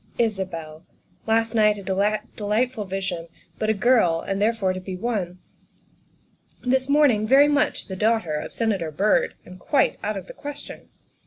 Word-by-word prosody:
Isabel 185 -8 -2 0.4
last 225 +1 +2
night 210 -2 +4
a 200 - -8
delightful 210 +4 -1
vision, 190 -3 -4 0.3
but 215 - 0
a - - +4
girl, 200 -7 +3
and 195 0 -3
therefore 210 -4 +1
to 185 - -5
be 185 0 -6
won; 185 -4 -3 1.3
this 260 +1 +1
morning 275 -8 +4
very 275 +4 +6
much 295 0 +1
the 190 - -6
daughter 215 -5 +1
of 150 - -4
Senator 200 -8 -1
Byrd 195 +8 +1
and 185 +1 -12
quite 280 +9 +1
out 210 0 -2
of 190 - -7
the - - -10
question. 290 0 -9
210 Hz, 155 wpm, -24 LUFS, 185-230 Hz, 1.3 s, very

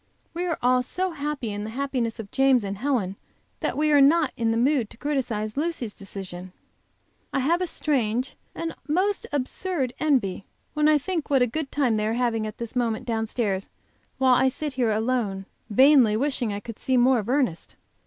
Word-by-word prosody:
We 350 +2 -2
are 335 - -1
all 250 0 +4
so 365 +8 -2
happy 285 -7 -3
in 205 0 -4
the 215 - -5
happiness 245 -2 -2
of 205 -3 -7
James 265 -3 +4
and 200 0 -4
Helen 225 -8 -1 0.4
that - - -2
we 305 0 +2
are 290 -1 +6
not 300 +1 +4
in 230 -1 0
the 225 - +1
mood 250 -2 +2
to - - -15
criticise 240 -7 -2
Lucy's 290 -8 -2
decision. 185 -2 -8 0.8
I - - -1
have 335 +7 +2
a 365 - 0
strange 255 -6 -1 0.2
and 330 -1 -3
most 375 +7 0
absurd 285 0 -1
envy 250 -12 +1 0.3
when 300 0 +2
I 305 -1 +5
think 330 +1 -3
what 270 -3 +4
a - - +4
good 275 +4 -4
time 255 -7 +1
they 210 0 0
are 220 - 0
having 230 -2 0
at 215 - -8
this 235 +1 -6
moment 230 -3 0
downstairs, 220 -4 -1 0.5
while 260 -1 +4
I 260 +1 +4
sit 290 +2 -2
here 250 -3 +1
alone, 215 -3 -1 0.2
vainly 255 -1 +6
wishing 260 -3 -1
I 200 0 -4
could 230 0 -9
see 260 -1 +1
more 250 0 +4
of 215 +1 -5
Ernest. 255 - 0
250 Hz, 195 wpm, -25 LUFS, 220-290 Hz, 0.8 s, are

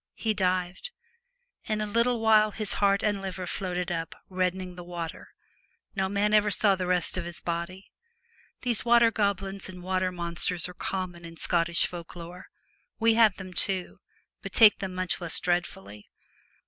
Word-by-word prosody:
He 220 -1 -1
dived. 185 - -1 0.8
In 215 -1 -1
a 215 - -1
little 235 +3 +1
while 215 -1 +5
his 215 -1 -4
heart 200 0 +3
and 205 -2 0
liver 190 -1 -5
floated 180 0 -3
up, 165 -1 -4
reddening 185 0 -2
the 175 0 -9
water. 170 -2 -7 0.7
No 190 -1 0
man 205 +1 +1
ever 210 0 +4
saw 200 +1 +3
the 185 -1 -2
rest 180 0 0
of 170 - -4
his 175 -1 -6
body. 170 +3 -5 0.7
These 240 -4 +1
water 235 -1 +5
goblins 195 -3 -1
and 180 -1 -10
water 185 0 0
monsters 170 0 -2
are 180 - -9
common 180 -1 -4
in 165 0 -10
Scottish 170 0 +2
folk 170 -1 -8
lore. 175 +2 -10 0.5
We 225 0 +4
have 220 -4 +4
them 185 -2 -9
too, 185 +1 +2 0.4
but - - -8
take 220 -3 +7
them 190 -2 -5
much 185 0 0
less 170 -2 0
dreadfully. 105 - -3
185 Hz, 165 wpm, -27 LUFS, 175-205 Hz, 0.8 s, take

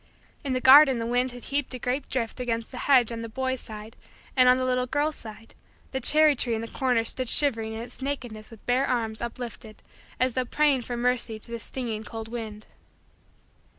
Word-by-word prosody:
In 275 -3 -2
the 255 - 0
garden 270 0 +8
the 230 - -3
wind 245 +2 +1
had 245 0 -10
heaped 280 -2 -2
a - - -4
great 250 +3 -3
drift 235 -1 -2
high - - -3
against 230 -2 -3
the 250 - -7
hedge 250 -4 +5
on 230 0 -5
the 230 - -6
boy's 260 +2 -2
side, 215 0 -10 0.4
and, 255 -1 +6
on 250 - +6
the 255 - -1
little 250 0 0
girl's 295 +4 0
side, 225 0 -12 0.4
the 265 - -2
cherry 305 +3 +5
tree 240 -2 -1
in 220 - -3
the 230 - -5
corner 245 -2 0
stood 255 +1 -2
shivering 225 -6 +2
in 220 - -5
its 240 +2 -10
nakedness 245 -6 -5
with 225 -3 -15
bare 255 +3 +2
arms 225 -3 -2
uplifted 235 -2 -7 0.4
as 255 0 +1
though 255 - 0
praying 285 +1 +2
for 240 0 -5
mercy 240 -2 0
to 225 +2 -7
the 235 - -4
stinging 225 -2 -5
cold 225 0 -7
wind. 220 -3 -7
245 Hz, 215 wpm, -26 LUFS, 225-260 Hz, 0.4 s, garden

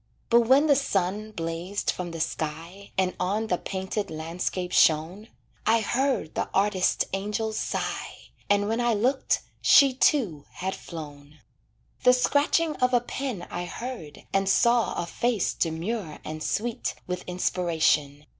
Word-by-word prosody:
But 235 -1 +5
when 270 +4 +6
the 290 -2 +5
sun 210 -4 -1
blazed 170 +2 -2
from 180 -1 -5
the 165 -1 -6
sky, 165 +5 -4
And 185 -1 +1
on 200 +5 0
the 180 -5 -1
painted 195 +2 -3
landscape 175 +3 -3
shone, 165 +8 +3 0.4
I 225 +1 +3
heard 255 - 0
the - - -2
artist 195 -2 +2
angel 210 +3 -2
sigh, - - -4 0.2
And 205 0 +3
when 225 +2 0
I 240 -2 +2
looked 255 +6 +1 0.2
she, 275 -2 +6
too, 225 - +2
had 190 +1 -3
flown. 150 -2 -10 0.6
The 250 - +6
scratching 290 +5 +2
of 250 0 +2
a - - +5
pen 240 -5 -4
I 175 0 -3
heard 180 - -7
And 195 0 +2
saw 235 +3 +3
a 175 - -1
face 225 +3 0
demure 165 +1 -2
and 155 0 -6
sweet 230 +6 -2
With 180 0 -3
inspiration. 160 -5 0
195 Hz, 145 wpm, -26 LUFS, 170-235 Hz, 0.6 s, when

